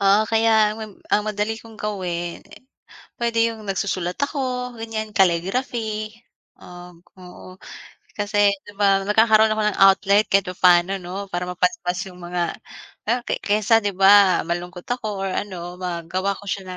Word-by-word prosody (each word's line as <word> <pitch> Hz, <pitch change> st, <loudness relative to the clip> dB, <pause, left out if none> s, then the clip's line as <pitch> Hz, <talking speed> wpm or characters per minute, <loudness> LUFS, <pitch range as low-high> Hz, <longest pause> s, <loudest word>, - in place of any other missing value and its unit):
Ah, 200 Hz, +2 st, +3 dB
kaya 220 Hz, -1 st, +3 dB
mam 215 Hz, -3 st, -10 dB
ang 210 Hz, -, +2 dB
madali 215 Hz, +1 st, -2 dB
kong 225 Hz, -1 st, -14 dB
gawin, 175 Hz, -5 st, -4 dB, 0.8 s
pwede 230 Hz, -1 st, +1 dB
yung 220 Hz, -, -11 dB
nagsusulat 185 Hz, -2 st, -2 dB
ako 255 Hz, -3 st, -2 dB
ganyan, 220 Hz, -1 st, -5 dB
calligraphy. 215 Hz, +4 st, 0 dB, 0.5 s
Ah, 180 Hz, -1 st, -13 dB, 0.2 s
oo, 185 Hz, +1 st, -13 dB, 0.6 s
kasi 205 Hz, 0 st, +2 dB, 0.2 s
'di -, -, -12 dB
ba 195 Hz, -1 st, +3 dB
nagkakaroon 220 Hz, +1 st, +4 dB
ako 215 Hz, 0 st, -1 dB
ng -, -, -4 dB
outlet 200 Hz, +2 st, +4 dB
kahit 195 Hz, -2 st, +3 dB
paano 180 Hz, +1 st, +4 dB
'no, 185 Hz, +3 st, -6 dB
para 175 Hz, 0 st, -2 dB
mapaspas 180 Hz, 0 st, -1 dB
yung 180 Hz, -, -13 dB
mga 175 Hz, 0 st, -2 dB, 0.7 s
kay -, -, -1 dB
kaysa 215 Hz, +2 st, +3 dB
'di 200 Hz, -, 0 dB
ba 195 Hz, -1 st, +6 dB
malungkot 175 Hz, +1 st, -4 dB
ako 215 Hz, -5 st, -3 dB
or 195 Hz, -, -2 dB
ano 180 Hz, -3 st, -5 dB
magawa 180 Hz, +2 st, -3 dB
ko -, -, -13 dB
siya 195 Hz, 0 st, -3 dB
200 Hz, 145 wpm, -22 LUFS, 180-220 Hz, 0.8 s, ba